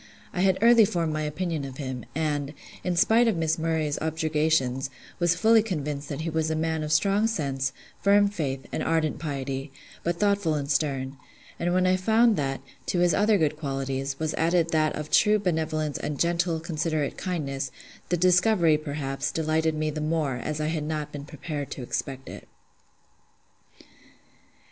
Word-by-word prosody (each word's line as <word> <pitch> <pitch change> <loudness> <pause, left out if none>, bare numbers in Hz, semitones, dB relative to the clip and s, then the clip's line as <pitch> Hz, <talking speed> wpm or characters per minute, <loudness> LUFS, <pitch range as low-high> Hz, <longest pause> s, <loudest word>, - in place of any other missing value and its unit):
I 180 - -1
had 190 -1 +3
early 235 -1 +7
formed 170 -5 0
my 155 - -1
opinion 155 0 -2
of 135 -1 -7
him; 130 -5 -5
and, 150 -2 -1 0.3
in 180 -1 0
spite 225 +7 +4
of 215 -6 +1
Miss 160 0 0
Murray's 160 -2 0
objurgations: 155 -5 0 0.3
was 175 0 +3
fully 220 +4 +5
convinced 150 -8 -4
that 145 +1 -4
he 165 - -2
was 160 0 0
a 160 - 0
man 160 0 -1
of 150 0 -3
strong 200 +7 +3
sense, 135 -10 -1 0.3
firm 205 0 +5
faith, 145 -9 -3
and - - -2
ardent 155 -3 0
piety, 135 -2 -4 0.3
but 170 0 -1
thoughtful 200 -6 +2
and 140 0 -2
stern: 135 -3 -1 0.4
and 175 +1 0
when 185 +1 +2
I 185 0 +3
found 220 +4 +4
that, 135 -4 -2 0.3
to - - 0
his 175 -1 +3
other 210 +4 +4
good 155 -4 +1
qualities, 135 -2 -3
was 155 0 -2
added 165 +1 +2
that 155 -1 +2
of 150 0 -6
true 210 0 +5
benevolence 155 -5 -1
and 145 -2 -4
gentle, 170 -1 +1
considerate 155 -2 -2
kindness, 140 -7 -3 0.4
the 175 - +2
discovery, 180 -2 +4
perhaps, 145 -3 -3
delighted 160 0 0
me 155 0 -1
the 155 +1 -4
more, 155 -4 0
as 150 +5 -4
I 155 0 0
had 160 -2 -2
not 150 -1 -3
been 145 -1 -7
prepared 150 -1 -5
to 130 - -6
expect 135 +2 -4
it. - - -9
155 Hz, 170 wpm, -26 LUFS, 145-175 Hz, 0.4 s, early